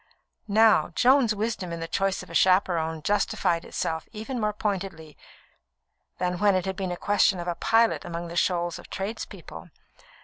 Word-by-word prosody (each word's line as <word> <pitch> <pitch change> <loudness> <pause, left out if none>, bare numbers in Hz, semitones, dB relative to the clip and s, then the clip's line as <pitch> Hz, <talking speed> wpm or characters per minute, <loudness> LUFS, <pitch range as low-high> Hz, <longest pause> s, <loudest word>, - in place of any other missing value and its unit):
Now, 215 -5 +4
Joan's 250 -3 +4
wisdom 210 -4 -3
in 170 - -4
the 165 - -4
choice 195 +3 -1
of - - -13
a - - -9
chaperon 170 -4 +2
justified 175 -2 0
itself 160 -1 -4
even 225 +4 -5
more 210 0 +1
pointedly 190 -7 -4 1.0
than 180 0 -2
when 205 -1 +4
it 185 - 0
had 190 0 -3
been 190 -2 -3
a 175 - -4
question 205 -1 +2
of 175 - -5
a 175 - 0
pilot 225 +6 +2
among 170 0 -6
shoals 175 -1 0
of - - -14
tradespeople. 195 +4 -7
190 Hz, 165 wpm, -26 LUFS, 170-210 Hz, 1.0 s, Now